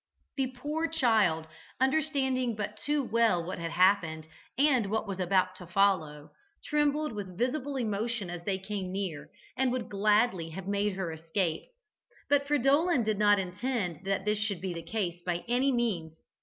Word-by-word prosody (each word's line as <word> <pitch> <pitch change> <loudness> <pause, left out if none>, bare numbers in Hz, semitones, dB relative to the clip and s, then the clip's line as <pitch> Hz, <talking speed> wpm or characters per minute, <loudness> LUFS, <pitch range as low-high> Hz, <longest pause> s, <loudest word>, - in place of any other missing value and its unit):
The 270 -2 0
poor 295 +6 -3
child, 220 - +2 0.3
understanding 265 -3 +1
but 210 0 -4
too 290 +7 -1
well 230 -7 +2
what 180 +1 -5
had 165 0 -3
happened 165 -3 +2 0.3
and 260 -7 +3
what 220 +1 -1
was 195 -1 -4
about 185 0 +2
to 180 - -10
follow, 170 -6 +1 0.3
trembled 300 0 +1
with 190 -4 -6
visible 270 +4 -1
emotion 225 -3 -2
as 175 -1 -6
they 195 +1 -1
came 190 -1 -4
near, 180 -7 -4 0.3
and 260 -1 +1
would 250 -2 -3
gladly 205 -3 +2
have 185 +3 -7
made 200 0 0
her 185 -3 -3
escape. 165 +1 -2 0.7
But 280 -1 +3
Fridolin 285 +1 +3
did 215 -1 -1
not 205 -1 +5
intend 190 - -2
that 195 0 -1
this 210 0 +1
should 210 -4 -1
be 185 0 -3
the 170 - -5
case 175 -1 -3
by 175 -1 -2
any 255 +3 +2
means. 185 -10 -1
205 Hz, 165 wpm, -30 LUFS, 180-255 Hz, 0.7 s, not